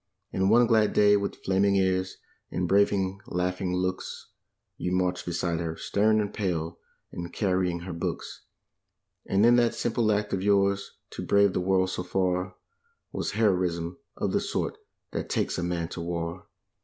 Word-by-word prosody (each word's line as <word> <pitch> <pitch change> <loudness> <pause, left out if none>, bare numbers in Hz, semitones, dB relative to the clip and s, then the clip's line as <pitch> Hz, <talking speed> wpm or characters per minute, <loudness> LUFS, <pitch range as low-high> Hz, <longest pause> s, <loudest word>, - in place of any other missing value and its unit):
And 95 +1 +2
one 120 +3 +6
glad 110 -2 +3
day, 105 0 +5
with 100 0 -3
flaming 100 +1 +3
ears, 95 -1 +1 0.3
and 90 - -1
braving 95 0 +2
laughing 90 +1 -1
looks, 95 0 -3 0.5
You 90 - -3
marched 90 -1 0
beside 85 -1 -1
her, 80 -1 -3
stern 110 +2 +2
and 105 -1 -2
pale, 85 -6 -2 0.3
and 85 0 -6
carrying 90 -4 0
her 90 0 -6
books. 85 - -4 0.9
And 100 +3 +3
in 120 +1 +6
that 120 -1 +3
simple 115 -2 +1
act 105 0 0
of 95 - 0
yours, 100 0 +2 0.2
to - - -6
brave 100 -1 +4
the - - 0
world 95 0 +2
so - - -3
far 90 0 -1 0.6
Was - - -3
heroism 90 -5 0 0.2
of - - -1
the - - +2
sort - - -2 0.4
that - - -4
takes - - 0
a - - -2
man 85 -1 -1
to 90 - -6
war. 85 +1 -4
95 Hz, 165 wpm, -27 LUFS, 90-100 Hz, 0.9 s, one